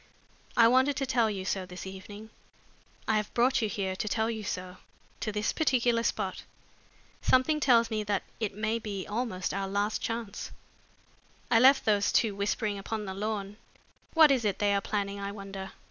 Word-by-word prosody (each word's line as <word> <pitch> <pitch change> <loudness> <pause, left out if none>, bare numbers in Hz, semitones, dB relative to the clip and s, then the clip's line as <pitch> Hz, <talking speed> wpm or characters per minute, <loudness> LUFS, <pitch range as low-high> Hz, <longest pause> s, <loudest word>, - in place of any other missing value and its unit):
I 230 -1 +8
wanted 260 +4 +4
to 270 - 0
tell 240 -4 +2
you 195 -3 -4
so 190 -1 -2
this 180 +1 -8
evening. 205 +3 -9 0.8
I 220 - +3
have 210 -1 -2
brought 245 +2 +3
you 220 - 0
here 195 -3 -2
to 215 - -3
tell 220 +2 0
you 220 -1 -4
so 185 -1 -5 0.4
to 215 - -2
this 210 +1 -1
particular 245 -6 +2
spot. 200 -4 -2 0.8
Something 280 +4 +3
tells 235 -5 +4
me 215 -1 -1
that 205 -1 0 0.2
it 215 -3 -2
may 215 +2 -1
be 205 -4 -5
almost 210 -4 -2
our 195 0 -2
last 205 +2 -1
chance. 230 -3 -4 1.0
I 225 - +6
left 265 +3 +6
those 205 -2 +3
two 220 -3 +2
whispering 200 +1 -1
upon 215 +1 -4
the 190 - -5
lawn. 205 0 -4 0.6
What 315 -3 +8
is 260 -4 +2
it 205 -3 0
they 205 -1 +2
are 200 - +1
planning, 200 -1 -2
I 200 0 -4
wonder? 195 -1 -8
210 Hz, 180 wpm, -29 LUFS, 200-230 Hz, 1.0 s, I